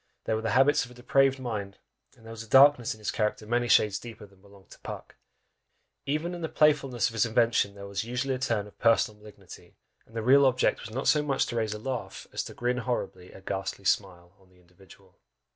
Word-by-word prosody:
They -, -, -2 dB
were 110 Hz, -, -1 dB
the 115 Hz, -, -2 dB
habits 140 Hz, +2 st, +4 dB
of 125 Hz, -, -10 dB
a 125 Hz, -, -15 dB
depraved 135 Hz, +2 st, +2 dB
mind, 105 Hz, -6 st, -5 dB, 0.4 s
and 115 Hz, -, -20 dB
there 115 Hz, -, -10 dB
was 115 Hz, -1 st, -8 dB
a 115 Hz, -, -12 dB
darkness 135 Hz, -4 st, +5 dB
in -, -, -17 dB
his 105 Hz, -2 st, -3 dB
character 110 Hz, 0 st, -2 dB
many 120 Hz, +2 st, 0 dB
shades 105 Hz, -4 st, +3 dB
deeper 115 Hz, -1 st, -10 dB
than 100 Hz, -2 st, -23 dB
belonged 100 Hz, -1 st, -20 dB
to -, -, -14 dB
Puck; -, -, -9 dB, 0.9 s
even 155 Hz, +5 st, -2 dB
in 175 Hz, -, -7 dB
the 160 Hz, -, -3 dB
playfulness 135 Hz, -5 st, +2 dB
of -, -, -13 dB
his 110 Hz, -, +2 dB
invention 115 Hz, -3 st, +1 dB
there 100 Hz, 0 st, -9 dB
was 100 Hz, +1 st, -4 dB
usually 125 Hz, +3 st, -2 dB
a 130 Hz, -, -4 dB
turn 115 Hz, -5 st, -1 dB
of 105 Hz, -, -17 dB
personal 110 Hz, -2 st, +2 dB
malignity, 105 Hz, -1 st, -14 dB, 0.3 s
and 115 Hz, -, -19 dB
the 115 Hz, -, -3 dB
real 135 Hz, +3 st, +6 dB
object 130 Hz, -1 st, +1 dB
was 115 Hz, -, -8 dB
not 130 Hz, +5 st, -4 dB
so 150 Hz, -, +4 dB
much 140 Hz, -2 st, 0 dB
to 120 Hz, -, -6 dB
raise 110 Hz, -2 st, -1 dB
a -, -, -5 dB
laugh, 125 Hz, +2 st, -6 dB
as -, -, -2 dB
to -, -, -10 dB
"grin 125 Hz, +1 st, -1 dB
horribly 115 Hz, -7 st, -4 dB
a -, -, -14 dB
ghastly 95 Hz, 0 st, -5 dB
smile," 90 Hz, -3 st, -1 dB
on 95 Hz, -1 st, -25 dB
the 90 Hz, -, -26 dB
individual. 90 Hz, +1 st, -21 dB
115 Hz, 230 wpm, -27 LUFS, 100-130 Hz, 0.9 s, real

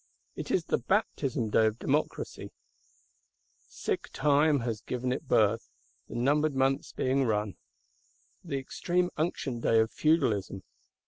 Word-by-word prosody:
It -, -, -6 dB
is -, -, +1 dB
the -, -, 0 dB
baptism 120 Hz, -5 st, 0 dB
day 110 Hz, +1 st, +4 dB
of 110 Hz, +1 st, -2 dB
Democracy; -, -, -2 dB, 1.2 s
sick -, -, -3 dB
Time 145 Hz, -1 st, +3 dB
has 115 Hz, -2 st, -3 dB
given 125 Hz, 0 st, -3 dB
it 135 Hz, +3 st, -3 dB
birth, 110 Hz, -1 st, +2 dB, 0.4 s
the -, -, -9 dB
numbered 145 Hz, +4 st, +2 dB
months 135 Hz, +1 st, +1 dB
being 135 Hz, +1 st, +1 dB
run. 105 Hz, -4 st, -1 dB, 0.9 s
The 155 Hz, -6 st, -3 dB
extreme 175 Hz, +6 st, -1 dB
unction 150 Hz, -6 st, -2 dB
day 115 Hz, -1 st, +3 dB
of 110 Hz, 0 st, +2 dB
Feudalism! 115 Hz, -, +1 dB
130 Hz, 130 wpm, -29 LUFS, 110-145 Hz, 1.2 s, day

